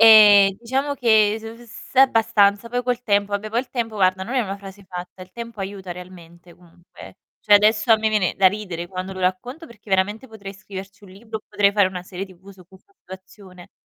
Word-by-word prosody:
Ehm, 210 -3 +8
diciamo 270 +4 -2
che 220 -5 +3
s - - -18
uhm, 230 +2 -10
s 230 - -14
abbastanza, 225 -4 +3
poi 245 +1 -3
col 250 -1 -2
tempo 205 -2 0
vabbè 205 +1 -3
poi 230 - 0
il 255 - -4
tempo 225 -4 -4
guarda 185 -1 +1
non 240 +7 -5
è 255 - +2
una 200 -3 -4
frase 200 0 -13
fatta, 180 0 -9
il 185 0 -15
tempo 235 -1 -9
aiuta 195 -1 -7
realmente 175 -1 -12
comunque, 175 0 -21
eh. - - -12 0.2
Cioè, 210 - +4
adesso 215 +3 +3
a 225 - +8
me 220 0 0
viene 210 -4 0
da 195 - +4
ridere 185 -4 -2
quando 185 +1 -6
lo 190 - -9
racconto 245 - -3
perché 215 -3 -17
veramente 205 +6 0
potrei 200 -3 -10
scriverci 195 0 -11
un 190 - -15
libro 220 +3 -8
o - - -27
potrei 200 -1 +2
fare 200 -2 +3
una 180 -1 -8
serie 185 +1 -6
TV 190 +1 -16
su 190 -2 -17
questa 190 - -21
situazione. 185 -1 -14
200 Hz, 220 wpm, -21 LUFS, 185-225 Hz, 0.2 s, Ehm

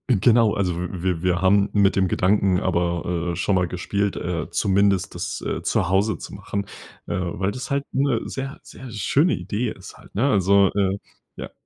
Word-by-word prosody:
G 125 - +5
genau, 115 0 +4
also 90 -4 0
w 90 +1 -3
wir 90 -3 0
wir 90 -1 +1
haben 100 +1 +4
mit 100 -1 +3
dem 95 -1 +2
Gedanken 95 0 +2
aber, 85 -1 -1
äh, - - -4
schon 100 - 0
mal 90 -1 +2
gespielt, 100 +3 -2
äh, 85 -3 -3
zumindest 100 -2 +1
das, - - -4
äh, - - -2
zu 85 - 0
Hause 100 +4 +2
zu - - -9
machen, 100 0 -4 0.4
äh, - - -3
weil 90 +2 -2
das 125 +6 -6
halt 140 0 0
'ne 135 -4 +1
sehr, 135 +1 -5
sehr 130 - -11
schöne 135 - +2
Idee 110 +2 -3
ist 95 - -11
halt, - - -18
ne? 125 +8 +2
Also, 100 0 +4
äh 100 -1 +1 0.4
ja. - - -7
100 Hz, 195 wpm, -23 LUFS, 90-105 Hz, 0.4 s, G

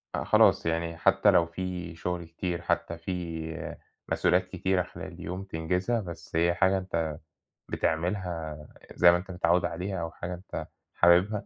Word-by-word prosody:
آآ - - -1
خلاص، - - +5
يعني 85 0 -1
حتّى 100 +3 +4
لو 85 -3 +5
في 90 0 -5
شُغل 90 +1 -3
كتير، 85 +1 -4
حتّى 85 -1 -1
في 80 -2 -5 0.4
مسؤوليات 90 +1 +3
كتيرة 95 0 +1
خلال - - -9
اليوم 90 +4 -5
تنجزها، 90 +6 -1
بس 85 -4 -9
هي 85 +1 +3
حاجة 95 +1 +3
أنت 85 -4 -2 0.5
بتعملها 85 -2 -1 0.4
زي 85 0 +7
ما 85 - +3
أنت 95 +2 -8
متعوِّد 90 0 +2
عليها 95 0 -3
أو 85 -1 -4
حاجة 90 +1 -5
أنت 90 +2 -6 0.3
حاببها، 90 +5 +4
90 Hz, 150 wpm, -28 LUFS, 85-95 Hz, 0.5 s, زي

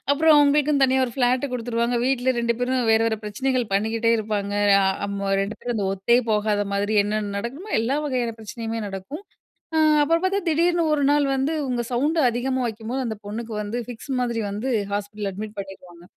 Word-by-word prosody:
அப்புறம் 310 +2 +5
அவங்களுக்குன்னு 290 -1 +3
தனியா 265 0 +2
ஒரு 240 - -7
ஃப்ளாட்டு 255 +1 +1
குடுத்துருவாங்க. 235 0 -1
வீட்ல 260 -1 +1
2 235 0 +1
பேரும் 250 0 0
வேற 220 - +4
வேற 220 -1 0
பிரச்சனைகள் 255 +4 -1
பண்ணிக்கிட்டே 225 +3 +1
இருப்பாங்க. 205 -2 -2 0.3
அ - - +2
அ 190 0 +2
அமு 200 -1 -3
2 200 +2 -4
பேரும் 240 -1 -3
அந்த 200 -2 -1
ஒத்தே 215 +6 +3
போகாத 210 -1 +1
மாதிரி 205 +2 0
என்னென்ன 205 -1 -2
நடக்கணுமோ, 280 - -6
எல்லா 255 +5 0
வகையான 245 -4 -1
பிரச்சனையுமே 225 +1 -5
நடக்கும். 195 - -7 0.5
அ - - +3 0.2
அப்புறம் 330 +3 +2
பார்த்தா 395 +2 +1
திடீர்னு 340 +2 +2
1 285 - 0
நாள் 290 -1 +3
வந்து, 270 +4 0
"இவுங்க 250 -3 -1
சவுண்ட் 300 +7 +1
அதிகமா 260 +2 -1
வைக்கும்போது" 230 +4 -4
அந்த 220 -2 -4
பொண்ணுக்கு 225 +2 -5
வந்து, 210 +4 -4
ஃபிக்ஸ் 245 +3 -7
மாதிரி 235 -2 -1
வந்து 210 +6 -4 0.3
ஹாஸ்பிட்டல்ல 205 -1 -4
அட்மிட் 210 +2 -7
பண்ணிடுவாங்க. 180 -3 -11
235 Hz, 180 wpm, -23 LUFS, 210-265 Hz, 0.5 s, அப்புறம்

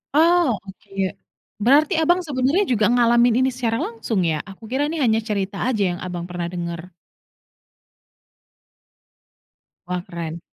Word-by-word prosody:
Oh, 335 -4 +4
oke. 195 +1 -14 0.7
Berarti 280 +8 +4
Abang 350 +3 +3
sebenarnya 285 +5 +1
juga 220 -4 +2
ngalamin 240 0 +4
ini 260 - +3
secara 235 -3 -1
langsung 225 -3 -2
ya? 160 -2 0
Aku 195 +2 -13
kira 270 +3 +1
nih 315 0 -3
hanya 225 -2 +3
cerita 200 -2 -3
aja 225 -6 +1
yang 175 - -5
Abang 175 -1 -4
pernah 175 -1 -3
dengar. 170 0 -6 2.9
Wah, 180 0 -3
keren. 170 -1 -6
225 Hz, 130 wpm, -22 LUFS, 180-260 Hz, 2.9 s, Oh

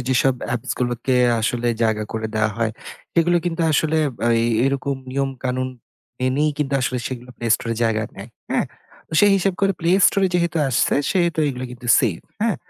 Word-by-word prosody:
যেসব 130 0 +3 0.2
appsগুলোকে 120 +1 -2 0.3
আসলে 120 +2 0
জায়গা 110 -1 +1
করে 110 0 -2
দেওয়া 110 0 +1
হয় 110 -1 0 0.4
সেগুলো 175 +1 +3
কিন্তু 170 -1 -2
আসলে 160 +1 +2 0.3
আ - - +3
এই 115 - +1 0.2
এরকম 140 0 0
নিয়ম-কানুন 130 -1 -2 0.5
মেনেই 135 +4 +1
কিন্তু 140 -2 -1
আসলে 125 0 -1
সেগুলো 125 -1 -7
Play 115 -1 -2
Store 115 - -4
এ - - -10
জায়গা 110 -1 +1
নেয়, 100 +3 -9 0.2
হ্যাঁ? - - +1 0.4
তো - - -18
সে 205 - +6
হিসাব 195 0 0
করে 195 0 +3
Play 175 +3 +3
Store 195 -1 +2
এ - - -1
যেহেতু 170 -1 +1
আসছে 125 - +2 0.2
সেহেতু 170 -4 +1
এগুলা 130 -1 -4
কিন্তু 125 0 -10
safe, 105 -10 -1 0.2
হ্যাঁ? 225 -3 +1
130 Hz, 180 wpm, -21 LUFS, 120-165 Hz, 0.5 s, সে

